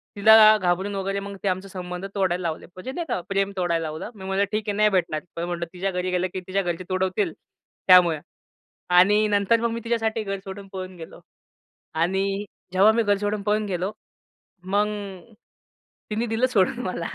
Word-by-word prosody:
तिला 215 +1 +8
घाबरवून 190 +2 0
वगैरे 195 +1 -2
मग 200 0 -7
ते - - 0
आमचा 190 +1 -1
संबंध 180 0 -6
तोडायला 185 -2 +1
लावले. 165 -2 -3
म्हणजे 185 +8 -6
नाही 340 +5 -4
का, 240 - 0
प्रेम 195 0 0
तोडायला 170 -2 0
लावलं. 155 +7 -6
मी 190 - -10
म्हटलं, 195 +1 +1
"ठीक 215 0 -2
आहे, 205 - -1
नाही 215 0 +5
भेटणार." 180 -5 0 0.2
पण 170 - -3
म्हटलं, 175 -1 -3
"तिच्या 190 +2 -2
घरी 180 0 -2
गेलं 180 0 +1
की 185 - -3
तिच्या 195 +1 0
घरचे 175 -1 -3
तुडवतील 185 -1 0 0.5
त्यामुळे. 175 -4 +7 0.7
आणि 200 +4 +5
नंतर 205 +2 +2
मग 235 -1 0
मी 230 - -3
तिच्यासाठी 225 -1 -1
घर 195 -1 -4
सोडून 195 0 -8
पळून 185 -1 -6
गेलो 165 -1 -10 0.7
आणि 180 +4 +1 0.5
जेव्हा 195 +4 +6
मी 230 +1 +1
घर 205 -1 +2
सोडून 205 0 -2
पळून 210 +1 +1
गेलो, 185 0 -2 0.7
मग 205 +3 +1 1.2
तिने 220 +3 0
दिलं 225 +3 +1
सोडून 205 +3 +2
मला. 170 -2 -3
195 Hz, 180 wpm, -24 LUFS, 180-210 Hz, 1.2 s, तिला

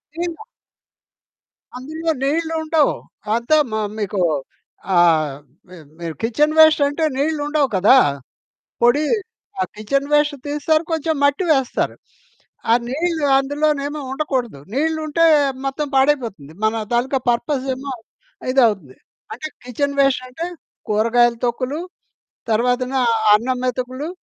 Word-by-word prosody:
దీన్‌లా 345 +4 -4 1.3
అందులో 315 +5 -5
నీళ్ళుండవు. 320 0 +1 0.4
అంత 235 +5 -4 0.2
మ - - -5 0.3
మీకు 200 -1 -2 0.8
ఆహ్, 160 -4 +4 0.4
మి 185 - -12 0.2
మి 170 - -8 0.2
కిచెన్ 295 +7 +1
వేస్ట్ 315 -2 +7
అంటే 290 +3 -2
నీళ్ళుండవు 295 -1 0
కదా. 200 +8 +6 0.9
పొడి, 285 +6 +4 0.6
ఆ - - +3
కిచెన్ 275 +7 -1
వేస్ట్ 295 0 +3
తీస్తారు. 300 +2 +1
కొంచెం 320 0 0
మట్టి 285 +6 +2
వేస్తారు. 270 -3 0 0.8
ఆ - - +7
నీళ్ళు 320 +2 -1
అందులోనేమో 290 +1 -1
ఉండకూడదు. 260 - -2
నీళ్ళు 315 +3 0
ఉంటే 330 +2 +2 0.4
మొత్తం 290 +2 -2
పాడైపోతుంది. 235 - +1
మన 220 0 +1
తాలూకా 260 +3 +1
పర్పస్ 260 +3 -1
ఏమో 270 +1 -6 0.6
ఇదవుతుంది. 210 - +2 0.4
అంటే 270 +7 -6 0.2
కిచెన్ 280 +3 -2
వేస్ట్ 275 -2 +3
అంటే 320 +7 -5 0.4
కూరగాయలు 230 +2 +3
తొక్కులు, 255 +6 -2 0.7
తర్వాతన 250 +3 +1 0.4
అన్నం 250 +3 -1
మెతుకులు 255 +5 -3
275 Hz, 110 wpm, -20 LUFS, 240-305 Hz, 1.3 s, వేస్ట్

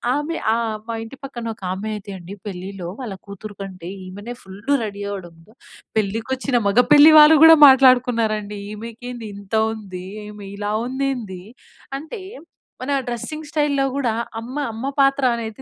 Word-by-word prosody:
ఆమె 300 +3 -2 0.2
ఆహ్, 230 0 -1 0.2
మా 230 - -2
ఇంటి 265 +4 -11
పక్కన 240 -3 -7
ఒక 200 - -19
ఆమె 210 +3 -5
అయితే 200 0 -10
అండి, 175 +3 -9 0.2
పెళ్ళిలో 185 -1 -7
వాళ్ళ 220 -5 -5 0.2
కూతురు 205 +1 -9
కంటే 185 -3 -8 0.2
ఈమెనే 205 +6 -8
ఫుల్ 190 +1 -12 0.2
రెడీ 205 -2 -5
అవ్వడంతో 175 -2 -9 0.4
పెళ్ళికి 220 +2 -1
వచ్చిన 260 -1 0
మగ 200 +4 +3
పెళ్ళి 295 +1 +9
వాళ్ళు 305 +1 +9
కూడా 325 0 +10
మాట్లాడుకున్నారండి. 235 -6 +4
ఈమెకేంది 230 +2 -8
ఇంత 200 +1 -6 0.2
ఉంది, 195 -5 -7 0.2
ఈమె 210 -1 -10
ఇలా 205 0 -3 0.2
ఉందేంది. 255 -7 -3 0.6
అంటే, 315 +10 -8 0.6
మన 260 +3 -3 0.2
డ్రెస్సింగ్ 300 +6 -5
స్టైల్‌లో 295 -3 +1
గూడా 255 -5 0 0.3
అమ్మ 240 +4 -8 0.2
అమ్మ 235 +5 -3
పాత్ర 275 0 +3
అనేది 225 +1 -6
225 Hz, 150 wpm, -21 LUFS, 200-265 Hz, 0.6 s, కూడా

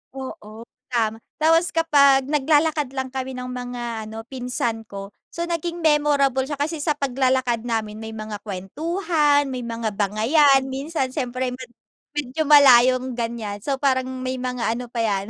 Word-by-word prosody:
Oo, 225 -4 -8 0.2
tama. 225 -3 -1 0.2
Tapos 325 +2 +3
kapag 280 -5 +5
nag 290 -2 -1
lalakad 305 -1 +3
lang 265 -1 -3
kami 265 0 -4
ng 250 0 -6
mga 240 -3 -5
ano, 220 +1 -7
pinsan 245 -4 -3
ko. 200 0 -8 0.2
So, 335 - -5
naging 340 0 -3
memorable 285 -4 +2
siya 295 - -3
kasi 305 +3 -2
sa 300 0 0
paglalakad 260 -3 +1
namin 215 -2 -2
may 220 0 -7
mga 215 -1 -6
kwentuhan, 290 - 0
may 255 - -4
mga 230 -2 -3
bangayan, 255 +8 +3
minsan 270 0 -2
siyempre 255 -2 -2
med 250 -1 -9 0.5
medyo 295 +2 -2
malayong 255 -3 +6
ganyan. 230 -4 -4
So, 275 +4 -2
parang 260 -2 +1 0.2
may 255 0 -3
mga 250 -3 -1
ano 245 +1 -6
pa 240 - -9
yan 200 -2 -1
255 Hz, 155 wpm, -22 LUFS, 230-290 Hz, 0.5 s, malayong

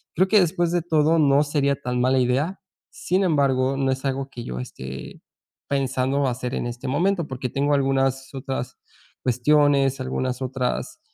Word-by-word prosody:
creo 185 +3 +3
que, 215 - +6
después 175 0 +1
de 175 -1 +1
todo 160 -1 +3
no 145 -1 +4
sería 140 -1 +1
tan 125 -2 -3
mala 130 +1 +3
idea. 135 +9 0 0.3
Sin 185 +2 0
embargo, 135 -5 +2
no 135 -1 +1
es 130 +1 -3
algo 135 0 -2
que 120 -3 -8
yo 60 0 -5
esté 65 +1 -8 0.5
pensando 135 0 0
hacer 125 0 -3
en - - -2
este 120 +2 -6
momento, 175 +4 +1
porque, 130 -2 -4
tengo 145 +3 0
algunas 135 -1 0
otras 130 -2 -4 0.5
cuestiones, 135 +1 +3
algunas 130 0 -2
otras, 130 - -3
135 Hz, 160 wpm, -23 LUFS, 130-145 Hz, 0.5 s, que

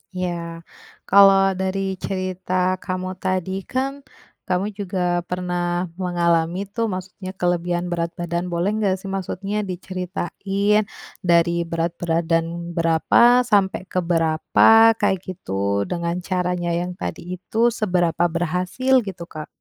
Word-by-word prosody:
Ya, 170 -2 -4 0.5
kalau 195 0 +7
dari 190 0 -2
cerita 185 -1 -1
kamu 185 0 -4
tadi 185 -1 -1 0.2
kan, 270 +2 -2 0.5
kamu 185 +3 0
juga 180 -3 0
pernah 175 -1 -2
mengalami 170 0 +1
tuh, 225 +3 -2
maksudnya 185 0 -6
kelebihan 175 0 -1
berat 170 0 -2
badan, 175 +1 -3
boleh 175 +3 0
nggak 195 -3 +2
sih 190 +1 -8
maksudnya 195 +2 -3
diceritain 195 +3 -1 0.3
dari 170 -2 +3 0.2
berat 165 0 -1
badan 170 0 -1
berapa 170 +9 +4
sampai 195 -2 +2
ke 185 - +1
berapa, 175 +7 +4
kayak 195 -3 +1
gitu, 100 - -2
dengan 170 0 -1
caranya 180 -2 -1
yang 175 +1 -2
tadi 180 0 -5
itu, 225 +6 0
seberapa 180 -7 +1
berhasil 180 +10 -1
gitu 190 -4 -7
Kak? 155 -1 -8
180 Hz, 120 wpm, -22 LUFS, 170-195 Hz, 0.5 s, kalau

